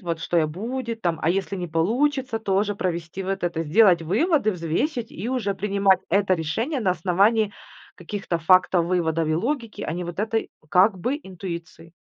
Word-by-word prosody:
вот 170 -3 -3
что 175 - -1
я 155 -2 +4
будет 230 +7 -4
там, 170 -3 0
а 160 - +2
если 195 +1 -1
не 180 -1 -4
получится 245 - 0
тоже 205 -1 0
провести 175 0 -3
вот 195 0 -3
это 170 -2 -1
сделать 175 +1 +5
выводы, 220 - +2
взвесить 215 - -2
и 210 +8 -5
уже 220 -7 -1
принимать 200 -1 +2
это 195 0 +3
решение 225 - -2
на 190 -4 +2
основании 200 +5 +2 0.4
каких-то 180 -1 -4
фактов, 180 0 +4
выводов 165 -3 0
и 155 - +1
логики, 230 - -2
а 155 - -3
не 175 +1 -4
вот 175 +2 -5
этой, 225 +1 -1 0.2
как 190 +2 +4
бы, 255 - -1
интуиции. 170 - -8
190 Hz, 175 wpm, -24 LUFS, 170-220 Hz, 0.4 s, сделать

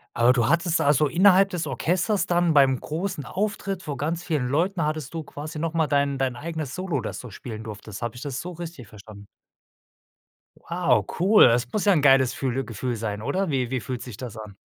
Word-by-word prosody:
Aber 120 +1 +5
du 120 -2 +2
hattest, 170 +2 +2
also, 145 +1 +3
innerhalb 190 +5 +5
des 175 -4 -3
Orchesters 180 +8 0
dann 175 -1 +2
beim 135 -3 +4
großen 160 -2 -4
Auftritt 195 +2 -3
vor 145 -5 -5
ganz 165 +4 -2
vielen 150 -8 -1
Leuten, 165 +5 0
hattest 155 -3 -3
du 160 - -3
quasi 150 +1 -8
noch 165 +1 -2
mal 160 -2 +1
dein 140 -1 +1
dein 130 -2 0
eigenes 155 0 -5
Solo, 180 -7 -2
das - - -5
du 125 - -9
spielen 110 +1 -8
durftest. 105 -1 -8
Habe 120 -1 -3
ich 120 - -9
das 140 -3 -4
so 180 - -6
richtig 170 - -8
verstanden? 100 0 -13 1.3
Wow, 140 - +1
cool. 200 +5 +7
Es 120 +1 +2
muss 210 - -1
ja 200 - +6
'n 155 - +2
geiles 135 -3 +5
fühle 135 0 -2
Gefühl 120 +1 -4
sein, 105 -2 -4
oder 190 +8 -1
wie 130 -4 -1
wie 130 - 0
fühlt 125 0 -5
sich 120 -6 -9
das 120 -3 -7
an? 105 -2 -9
145 Hz, 210 wpm, -25 LUFS, 125-170 Hz, 1.3 s, cool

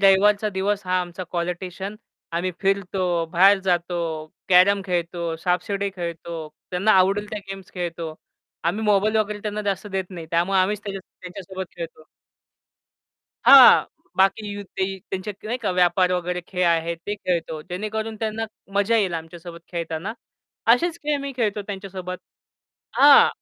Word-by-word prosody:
रविवारचा 200 +2 +5
दिवस 200 +1 -1
हा 185 0 +2
आमचा 180 +1 -6
क्वालिटिशियन. 180 +3 -4 0.4
आम्ही 175 +2 -1
फिरतो, 185 -3 0
बाहेर 195 +3 +6
जातो, 175 -1 0 0.5
कॅरम 190 +2 +6
खेळतो, 170 -2 -2
सापशिडी 195 +3 0
खेळतो, 170 -2 -5 0.2
त्यांना 195 +4 +3
आवडेल 195 +2 +3
त्या 215 - -3
गेम्स 195 -1 -8
खेळतो. 170 -3 -4 0.5
आम्ही 200 +6 0
मोबाईल 210 +1 +3
वगैरे 210 -1 0
त्यांना 210 0 -3
जास्त 200 +1 -2
देत 190 -2 -2
नाही. 170 -3 -8
त्यामुळे 175 +3 +2
आम्हीच 205 +2 0
त्याच्या 195 -1 -4 0.2
त्यांच्यासोबत 185 0 -7
खेळतो. 165 -2 -8 1.4
हां, 275 -2 +9 0.3
बाकी 195 +3 +3
यू 205 0 -6 0.2
ते 190 - +3 0.3
त्यांचेत 190 +1 -4
की - - -10
नाही 240 +3 -2
का 215 -6 -1
व्यापार 180 0 +3
वगैरे 180 0 -1
खेळ 180 -1 -1
आहेत, 170 0 +1
ते 205 - -1
खेळतो. 170 -5 -2
जेणेकरून 215 +5 -4
त्यांना 220 0 -2 0.3
मजा 205 +3 +3
येईल 190 -5 +1
आमच्यासोबत 170 +1 -8
खेळतांना. 170 +4 -3 0.6
असेच 340 +7 +1
खेळ 295 -1 0
मी 280 -1 -5
खेळतो 210 -4 0
त्यांच्या 195 -1 -7
सोबत 185 -1 -6 0.8
हां. 285 0 +8
190 Hz, 145 wpm, -23 LUFS, 175-205 Hz, 1.4 s, हां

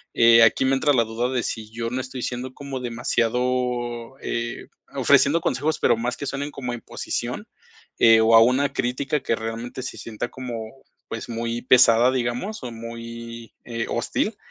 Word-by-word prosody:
eh, 115 0 +7
aquí 115 +3 +5
me 130 - +3
entra 140 +2 +2
la 120 -3 +4
duda 115 +2 -2
de 125 -2 -1
si 110 -2 -4
yo 115 0 -4
no 130 +1 -1
estoy 130 -1 -7
siendo 125 +1 -4
como 140 -2 -6
demasiado, 120 +1 -1
eh, 120 0 -4 0.3
ofreciendo 150 +4 +4
consejos, 155 +1 0
pero - - +4
más 120 +2 -2
que - - -5
suenen 140 +1 -3
como 125 -4 -5
imposición, 120 - -5 0.5
eh, 115 -1 +7
o 110 +1 +4
a - - +10
una 135 +4 +2
crítica 130 +4 -1
que 115 - 0
realmente 115 +3 -5
se 135 - -6
sienta 115 +1 -5
como, 120 -1 -7 0.2
pues, 115 +1 -6
muy 115 0 -3
pesada, 125 -1 +5
digamos, 130 - -2
o 125 - -4
muy, 115 0 -8
eh, 115 -1 -4
hostil, 205 - -1
120 Hz, 170 wpm, -23 LUFS, 115-130 Hz, 0.5 s, a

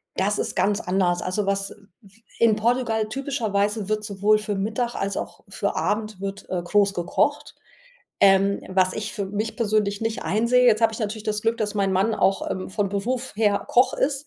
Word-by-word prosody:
das 205 +2 0
ist - - -3
ganz 205 +1 +2
anders 180 -1 +1
also, 195 +2 -2
was 195 0 -1 0.6
in 225 -2 +5
Portugal 225 -1 0
typischerweise 215 -5 -1
wird 215 0 -1
sowohl 210 +1 +2
für 210 -1 -3
Mittag 225 +4 -2
als 200 0 -2
auch - - -6
für - - -2
Abend 215 -1 -2
wird, 195 0 -6
äh, 180 -2 -1
groß 200 +2 +2
gekocht, 175 -2 -1 0.7
ähm, 195 0 +4
was 185 -1 +2
ich 215 0 -4
für 200 -3 -2
mich 210 +3 -3
persönlich 210 -3 0
nicht 225 0 -2
einsehe. 235 +4 +3
Jetzt 230 -1 +4
habe 225 0 +4
ich 225 - -6
natürlich 215 0 -3
das 210 -1 -2
Glück, 225 +1 0
dass 215 -3 -2
mein 195 -2 +1
Mann 195 +4 +2
auch, 195 -2 +1
ähm, 185 - -4
von 200 +1 -1
Beruf 240 +6 -2
her 205 -2 +2
Koch 250 +1 +4
ist, 275 +1 -1
210 Hz, 190 wpm, -24 LUFS, 195-225 Hz, 0.7 s, in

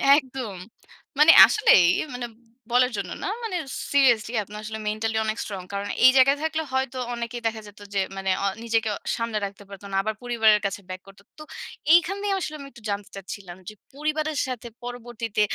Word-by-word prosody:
একদম। 260 -7 -3 0.6
মানে 305 +2 +9
আসলেই 190 - +5 0.3
মানে 245 0 -4 0.5
বলার 250 +1 +4
জন্য 195 -3 -4
না - - -2 0.2
মানে 435 -6 -2 0.3
seriously 245 -5 +3
আপনি 205 +1 -12
আসলে 220 +1 -6
mentally 220 +1 -1
অনেক 215 +1 -2
strong। 195 -3 -6
কারণ 200 0 -3 0.2
এই 255 - +10
জায়গায় 275 +2 +5
থাকলে 320 0 -1
হয়তো 265 -1 -1 0.2
অনেকেই 235 0 -5
দেখা 220 0 -4
যেত 205 0 -15
যে 200 - +1 0.2
মানে 195 0 -2
আ - - +1 0.2
নিজেকে 225 -1 0
অ - - -6 0.2
সামলে 230 -2 -2
রাখতে 200 0 -9
পারতো 200 0 -11
না। - - -3
আবার 215 +1 -2
পরিবারের 220 -3 +4
কাছে 200 0 -3
back 185 0 -6
করতো। 195 0 -16
তো 305 - -9 0.5
এইখানে 375 +4 +3
আসলে 310 -4 -4
আমি 280 - -9
একটু 235 - -16
জানতে 200 0 -3
চাচ্ছিলাম 190 -2 -8
যে - - -11 0.2
পরিবারের 305 +1 -2
সাথে 245 -2 -5 0.2
পরবর্তীতে 240 -3 -4
230 Hz, 180 wpm, -24 LUFS, 205-265 Hz, 0.6 s, এই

